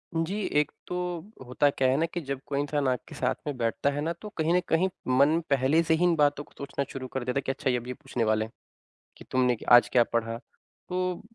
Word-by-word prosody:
जी। 165 +6 -1 0.2
एक 150 - 0 0.2
तो 180 - -4 0.5
होता 125 +4 +2
क्या 135 -1 +1
है 130 - +3
ना 160 - +2
कि 170 +1 -5
जब 140 -3 -4
कोई 140 -1 -2
इंसान 145 -1 0
आपके 125 -2 -2
साथ - - 0
में 145 - -2
बैठता 115 +4 0
है 145 +1 -3
ना 160 +3 -1
तो 210 - -7
कहीं 160 +1 +2
न 180 - +5
कहीं 180 +4 +2 0.2
मन 140 +5 +4
पहले 140 +3 +3
से 160 - +2
ही 160 +2 +2
इन 175 -1 +4
बातों 145 -1 +2
को - - -24
सोचना 140 0 -3
शुरू 130 -1 -6
कर 130 - -2
देता 125 +2 -2
है - - +2
कि - - +1
अच्छा 135 - -2
ये 125 - +2
अब 120 0 -7
ये 125 - -3
पूछने 130 -3 -3
वाले 110 0 +2
हैं 110 - -13 0.7
कि - - -13
तुमने 125 -1 +3
क - - -11
आज 120 0 +8
क्या 120 - +5
पढ़ा। 115 0 0 0.5
तो 180 -1 -1
140 Hz, 255 wpm, -28 LUFS, 125-160 Hz, 0.7 s, आज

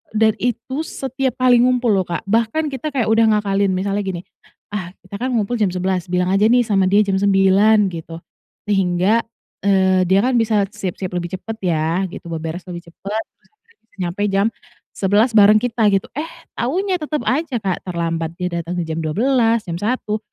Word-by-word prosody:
dan 220 0 +4
itu 250 +6 -2
setiap 265 -1 -3
kali 250 -2 +4
ngumpul 250 -1 +3
loh, 190 -3 +1
Kak. 170 - -3
Bahkan 230 +9 0
kita 275 +2 -5
kayak 230 -4 +1
udah 225 0 +4
ngakalin 200 -2 +1
misalnya 195 +2 -1
gini, 180 -2 -4 0.5
"ah 185 -3 -5
kita 200 +2 -8
kan 255 +1 -1
ngumpul 225 +2 -1
jam 210 - +3
11, 185 -1 -1
bilang 180 +1 0
aja 200 +2 +4
nih 245 +2 +4
sama 195 -4 +2
dia 205 +2 +4
jam 195 -1 0
9," 200 +1 +4
gitu, 165 0 -8 0.4
sehingga, 195 +1 +2 0.5
eee, 190 -2 +3
dia 190 +2 +4
kan 250 -1 +2
bisa 215 -2 +2
siap-siap 185 -1 -5
lebih 175 +1 -3
cepat 225 +4 -7
ya, 170 +1 0
gitu, 170 -2 -9
beberes 165 +2 -5
lebih 175 -1 -8
cepat, 200 +5 -5
terus - - -34
akhirnya 455 +2 -32
bisa 225 - -32
nyampe 180 +3 -2
jam 195 +2 +2 0.4
11 205 +5 +2
bareng 210 0 +7
kita, 230 -2 +1
gitu, 195 -1 0
eh 310 +2 -2 0.3
taunya 365 +9 -1
tetap 305 -1 -3
aja, 275 -1 0
Kak, 190 -2 -1
terlambat 165 -1 -2
dia 180 0 -3
datang 170 +2 -5
di - - 0
jam 160 0 -4
12, 230 - +1
jam 170 -1 -4
1. 215 -1 -1
200 Hz, 185 wpm, -19 LUFS, 180-235 Hz, 0.5 s, bareng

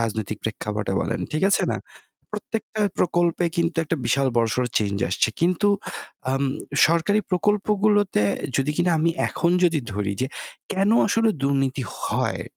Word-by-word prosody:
রাজনৈতিক 110 -2 -2
প্রেক্ষাপটে 105 -1 -3
বলেন, - - -2
ঠিক 155 - -1
আছে - - +3
না? - - -2 0.5
প্রত্যেকটা 220 -1 -4 0.2
প্রকল্পে 175 0 +2
কিন্তু 170 0 0
একটা 160 +2 -1
বিশাল 135 -1 +2
বড়সড় 120 +2 +1
চেঞ্জ 100 -2 -1
আসছে। 90 - +2
কিন্তু 180 +4 +2 0.6
আম 135 +1 0 0.4
সরকারি 170 +6 +2
প্রকল্পগুলোতে 205 - +2 0.3
যদি 135 +2 +1
কিনা 175 0 +2
আমি 165 +2 +3 0.2
এখন 170 - 0
যদি 165 -3 +3
ধরি 100 0 -2
যে - - +1 0.5
কেনো 200 +4 +3
আসলে 225 +1 +3
দুর্নীতি 135 -1 +1 0.2
হয়? - - -1
165 Hz, 140 wpm, -23 LUFS, 120-195 Hz, 0.6 s, আছে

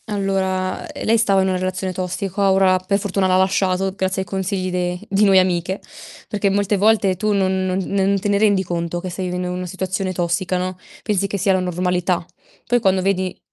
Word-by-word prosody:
Allora, 190 -2 -1
ehm, - - -7
lei 225 +1 +4
stava 200 -3 +3
in 190 - +1
una 185 -1 0
relazione 185 0 -2
tossica. 190 +2 -1
Ora, 190 -1 +4
per 190 +2 0
fortuna, 195 -1 0
l'ha 185 0 +3
lasciato, 190 0 +1
grazie 190 0 -1
ai - - -17
consigli 190 0 -2
de 180 0 -1
di 200 +2 +2
noi 195 -2 +5
amiche, 185 +1 0 0.5
perché 205 -1 0
molte 200 +1 +1
volte 205 -2 +3
tu 215 +3 0
non 190 -1 +1
non 185 0 0
non 195 0 +1
te 205 +1 0
rendi 205 -2 +3
conto 170 -1 -3
che 185 +1 -5
stai 185 +1 -4
vivendo 180 0 -3
in 180 - -3
una 180 0 -4
situazione 190 +1 -3
tossica, 180 +1 -1
no, 185 0 -3 0.3
pensi 200 -2 0
che 200 - -3
sia 195 +1 +2
la 185 - +2
normalità. 180 -1 -1 0.4
Poi, 245 +1 +2
quando 190 -3 +2
vedi 185 -1 -1
190 Hz, 205 wpm, -20 LUFS, 185-195 Hz, 0.5 s, noi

